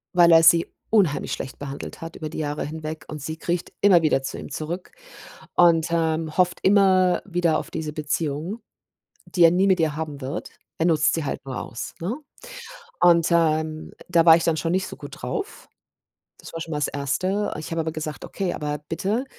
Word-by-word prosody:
Weil 170 -1 +6
er 165 0 +7
sie 165 +1 +6 0.2
unheimlich 195 -10 +2
schlecht 130 - -5
behandelt 140 -1 -7
hat 165 0 -7
über 155 - -5
die 160 - -6
Jahre 150 -1 -2
hinweg 155 +1 -6
und 150 -1 -7
sie 160 +3 -5
kriecht 175 +1 -3
immer 190 -4 +6
wieder 155 -4 +2
zu 135 - -5
ihm - - -8
zurück 165 +5 -5 0.6
und, 170 -2 +5
ähm, 160 -1 0
hofft 180 -1 +2
immer, 190 -2 +4
wieder 175 -4 +1
auf - - -9
diese 155 -2 -4
Beziehung, 155 +6 -3 0.7
die 175 - 0
er 165 - +8
nie 185 +3 +2
mit 190 -2 +3
ihr 155 -2 +1
haben 155 -3 -5
wird. 135 +5 -5 0.3
Er 160 - +1
nutzt 160 -2 +3
sie 165 - -2
halt 135 - -4
nur 130 -2 -4
aus, 115 - -7
ne, 180 +8 -2 0.9
und, 170 -2 +5
ähm, 155 -2 +1
äh, - - -15
da 170 -2 +4
war 165 -1 +9
ich 165 - -1
dann 165 -1 +2
schon 165 +2 -1
nicht 190 +1 0
so - - -9
gut - - -10
drauf. 410 +1 -5 0.7
Das - - -12
war 165 - -5
schon 165 - -6
mal - - -1
das 150 - +1
1., 140 +4 -2
erste 205 -3 -1
ich 155 - -7
habe 165 - -1
aber 160 0 -2
gesagt: 155 -2 -6
„Okay, 190 -3 -3
aber 150 0 -3
bitte, 205 +9 -1
165 Hz, 205 wpm, -24 LUFS, 155-175 Hz, 0.9 s, war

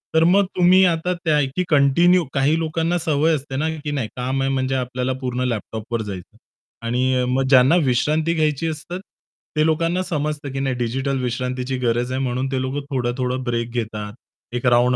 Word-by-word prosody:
तर 160 - +5
मग 195 +4 +4
तुम्ही 185 +1 +5
आता 175 +1 +1
त्या 165 -3 0
आहे, 145 -2 +2
की 180 - +1
कंटिन्यू 170 +5 +4
काही 140 +4 +2
लोकांना 165 +2 0
सवय 160 -1 +1
असते 135 -1 -6
ना, 155 +3 0
की 145 0 -5
नाही 135 -6 -2
काम 130 +2 -2
आहे 135 0 0
म्हणजे 130 0 0
आपल्याला 125 0 -2
पूर्ण 125 0 -2
लॅपटॉपवर 110 0 -3
जायचंय. 95 -4 -8 0.5
आणि 130 +2 +1
अ, - - 0
मग 130 +2 +1
ज्यांना 130 +3 +6
विश्रांती 155 +6 +1
घ्यायची 155 0 0
असतात, 160 +4 -5 0.6
ते 155 - +4
लोकांना 165 +3 +1
समजतं, 150 -4 -3
की 135 - -4
नाही 135 -2 -1
डिजिटल 130 +3 -1
विश्रांतीची 125 +1 -2
गरज 120 0 0
आहे 130 - -1
म्हणून 130 +1 -1
ते 130 - 0
लोक 135 +2 -3
थोडं-थोडं 125 0 -1
ब्रेक 120 -1 -2
घेतात, 110 -3 -4 0.4
एक 120 - -3
राउंड 125 0 +4
135 Hz, 185 wpm, -21 LUFS, 125-155 Hz, 0.6 s, ज्यांना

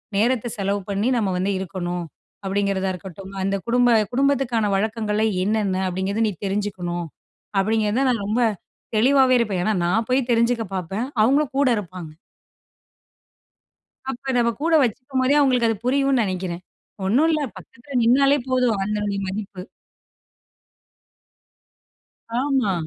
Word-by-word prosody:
நேரத்தை 240 +3 +1
செலவு 200 +1 -1
பண்ணி 200 +4 0
நம்ம 205 -4 0
வந்து 190 +2 0
இருக்கணும், 175 -1 -4 0.4
அப்படிங்கிறதா 195 -1 0
இருக்கட்டும், 190 +1 -9
அந்த 195 +1 0
குடும்ப 245 -1 +4 0.2
குடும்பத்துக்கான 260 -5 +1
வழக்கங்கள் 215 +1 -1 0.2
என்னென்ன 205 -3 0
அப்படிங்கிறத 190 +4 -1
நீ 210 - -2
தெரிஞ்சுக்கணும் 190 -4 -2 0.5
அப்படிங்கிறத 220 +4 +1
நான் 230 -5 0
ரொம்ப 220 +4 0 0.6
தெளிவாவே 260 +3 +4
இருப்பேன். 205 -6 0
ஏன்னா 215 - +1
நான் 220 +6 +1
போய் 255 -1 +1
தெரிஞ்சுக்க 235 0 +2
பாப்பேன், 190 +6 -3 0.2
அவுங்களும் 275 +4 +2
கூட 280 -1 +3
இருப்பாங்க. 180 -5 -7 2.0
அப்ப 265 +1 -5
நம்ம 235 -1 +3
கூட 330 +1 +1
வச்சுக்கும் 255 +3 -2
போதே, 270 +3 +3
அவங்களுக்கு 255 -5 +3
அது 225 - -1
புரியும்னு 275 -1 +2
நெனைக்கிறேன். 185 -2 -4 0.4
ஒண்ணும் 265 +11 +3
இல்ல 310 -1 +1 0.2
பக்கத்தில 255 +3 -7
நின்னாலே 275 +4 +4
போதும் 250 -3 +2
அதனுடைய 210 0 -2
மதிப்பு, 195 -1 -5 2.8
ஆமா. 265 -8 +1
215 Hz, 120 wpm, -22 LUFS, 195-255 Hz, 2.8 s, குடும்ப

